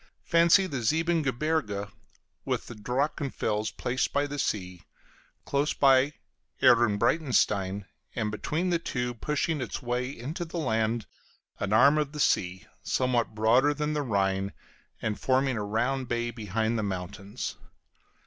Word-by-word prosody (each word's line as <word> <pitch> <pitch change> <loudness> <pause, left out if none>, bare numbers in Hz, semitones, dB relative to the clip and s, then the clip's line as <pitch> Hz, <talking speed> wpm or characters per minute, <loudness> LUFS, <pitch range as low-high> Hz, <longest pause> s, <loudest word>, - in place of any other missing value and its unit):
Fancy 170 +3 +5
the 140 -9 -3
Siebengebirge 150 -7 0 0.6
with - - -2
the - - -8
Drachenfels 125 -2 -1
placed 125 +2 -1
by 145 0 +1
the 145 0 -5
sea; 90 -7 -2 0.6
close 140 +1 0
by, 135 +1 +4 0.5
Ehrenbreitstein, 105 - +3 0.3
and 110 -2 -1
between 160 - -1
the 170 - +2
two, 125 -6 -2
pushing 150 +5 -1
its 125 - -4
way 125 +1 -1
into 145 +7 -5
the 170 +1 -6
land, 110 -6 0 0.5
an 100 - -2
arm 140 +7 +6
of 150 -1 -2
the 150 - -6
sea, 90 -8 +1 0.2
somewhat 125 -4 0
broader 125 +7 +4
than 150 0 -1
the 150 - 0
Rhine, 100 -5 0 0.5
and 110 -2 -2
forming 130 0 +2
a 105 - -2
round 120 +5 -1
bay 120 0 -1
behind 110 +1 -1
the - - 0
mountains. 100 +2 -5
125 Hz, 135 wpm, -28 LUFS, 105-145 Hz, 0.6 s, arm